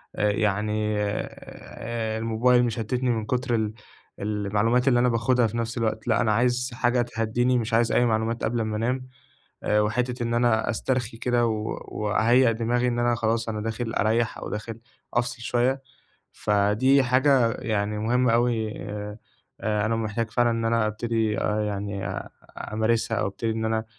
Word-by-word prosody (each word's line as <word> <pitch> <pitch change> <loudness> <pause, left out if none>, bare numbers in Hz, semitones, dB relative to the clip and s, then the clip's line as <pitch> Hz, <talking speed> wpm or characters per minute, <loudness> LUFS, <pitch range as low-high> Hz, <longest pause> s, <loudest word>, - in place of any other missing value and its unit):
آآ 105 0 +2
يعني 105 +1 0
آآ 110 +2 -4
الموبايل 115 +2 +3
مش 120 -3 -1
مشتتني، 125 +3 -1
من 110 -2 0
كُتر 125 +1 0
ال 110 -1 -1 0.5
المعلومات 105 +4 0
اللي 120 -2 +5
أنا 125 0 +3
باخدها 115 +1 +2
في 115 - -5
نفس 115 +1 -3
الوقت، 110 -1 -2
لأ 110 -4 +3
أنا 110 -3 +2
عايز 125 +3 +1
حاجة 120 +1 +1
تهدّيني، 120 +2 0
مش 115 0 -2
عايز 115 0 +3
أي 120 - +3
معلومات 115 0 0
قبل 115 0 0
ما 110 -1 -2
أنام. 125 +3 -1 0.6
آآ 105 - +2
وحتّة 120 +4 -1
إن 115 0 -1
أنا 120 -2 +2
أسترخي 120 +1 -2
كده، 120 0 +1
و 110 -1 -2
وأهيّئ 115 +4 +3
دماغي 120 +2 0
إن 120 -1 -1
أنا 120 0 +2
خلاص 115 0 0
أنا 110 -1 -2
داخل 115 +1 -3
أريّح، 115 +2 +1
أو - - -6
داخل 110 +1 -5 0.4
أفصل 120 0 -1
شويّة، 125 +3 +1 0.5
فدي 105 +7 +3
حاجة 130 -1 +3
يعني 105 -2 -2
مُهمة 120 +2 +2
أوي. 115 -2 +1 0.2
آآ 105 +1 -6 0.4
أنا 110 +1 0
محتاج 115 0 -2
فعلًا 120 +1 +2
إن 115 0 -1
أنا 115 -1 +2
أبتدي 110 0 -1
آآ 105 0 0
يعني 100 -1 -3
آآ - - -5 0.4
أمارسها، 115 +1 +1
أو - - 0
أبتدي 100 +4 -3
إن 110 0 -2
أنا 110 0 0
115 Hz, 170 wpm, -25 LUFS, 110-120 Hz, 0.6 s, اللي